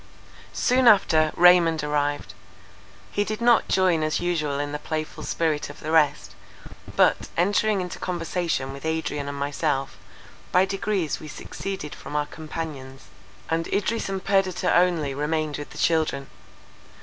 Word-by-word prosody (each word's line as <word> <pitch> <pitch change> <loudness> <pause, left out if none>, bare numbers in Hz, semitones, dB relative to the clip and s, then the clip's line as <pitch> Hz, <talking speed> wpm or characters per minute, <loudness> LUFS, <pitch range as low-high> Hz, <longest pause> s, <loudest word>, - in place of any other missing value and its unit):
Soon 255 0 +2
after, 160 -8 +5
Raymond 175 -3 +5
arrived. 145 -1 -1 0.8
He 205 - +1
did 215 +1 -4
not 235 -1 +4
join 185 -4 +2
as 155 0 0
usual 155 -5 -1
in 145 0 -3
the 150 - -4
playful 155 0 -5
spirit 155 -3 -1
of - - -11
the 155 - -5
rest; 155 -3 +2 0.6
but, - - +3
entering 205 +3 +2
into 180 -1 -6
conversation 170 -6 -2
with 140 - -10
Adrian 160 -3 -2
and 140 - -5
myself, 140 -1 -2 0.5
by 180 +1 +4
degrees 195 -4 -2
we 155 - -9
seceded 150 +2 -6
from - - -9
our 150 0 +1
companions, 145 -7 -8 0.4
and 165 +1 -1
Idris 210 +2 -1
and 195 -1 -3
Perdita 195 -2 +1
only 170 -6 +2
remained 150 +1 -1
with 145 - -7
the - - -12
children. 155 -4 +1
160 Hz, 145 wpm, -24 LUFS, 150-185 Hz, 0.8 s, after